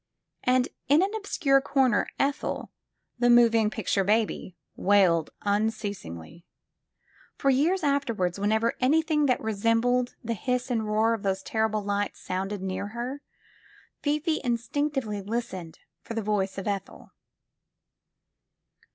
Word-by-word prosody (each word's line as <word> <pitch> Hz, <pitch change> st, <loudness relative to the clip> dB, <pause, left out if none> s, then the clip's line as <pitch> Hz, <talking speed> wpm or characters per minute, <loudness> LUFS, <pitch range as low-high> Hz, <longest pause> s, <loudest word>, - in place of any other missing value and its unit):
And 255 Hz, 0 st, +2 dB, 0.2 s
in 300 Hz, +5 st, +5 dB
an 400 Hz, +2 st, -1 dB
obscure 320 Hz, -10 st, +2 dB
comer 265 Hz, -5 st, +2 dB
Ethel, 280 Hz, +1 st, -1 dB, 0.5 s
the 245 Hz, 0 st, +3 dB
moving 230 Hz, -2 st, +5 dB
picture 210 Hz, -3 st, 0 dB
baby, 210 Hz, -2 st, 0 dB, 0.2 s
wailed 185 Hz, -5 st, +3 dB
unceasingly. 200 Hz, -, -3 dB, 0.9 s
For 275 Hz, -, +2 dB
years 325 Hz, +8 st, +2 dB
afterward, 240 Hz, -, 0 dB
whenever 220 Hz, +3 st, +1 dB
anything 300 Hz, +2 st, +3 dB
that 250 Hz, -, +2 dB
re 220 Hz, 0 st, -2 dB
sembled 230 Hz, +4 st, +1 dB
the 230 Hz, 0 st, -1 dB
hiss 250 Hz, +4 st, -2 dB
and 225 Hz, -3 st, 0 dB
roar 220 Hz, +2 st, +2 dB
of 225 Hz, -, -3 dB
those 195 Hz, -1 st, -1 dB
terrible 220 Hz, -1 st, 0 dB
lights 205 Hz, 0 st, -2 dB
sounded 190 Hz, +1 st, -3 dB
near 190 Hz, +1 st, -3 dB
her, 240 Hz, +6 st, -5 dB, 0.8 s
Fifi 305 Hz, +2 st, 0 dB
instinctively 245 Hz, -2 st, -1 dB
listened 190 Hz, -6 st, -4 dB, 0.2 s
for 230 Hz, -, -7 dB
the 225 Hz, -, -2 dB
voice 200 Hz, -2 st, -1 dB
of 195 Hz, -, -4 dB
Ethel. 200 Hz, -2 st, -5 dB
225 Hz, 125 wpm, -27 LUFS, 200-265 Hz, 0.9 s, in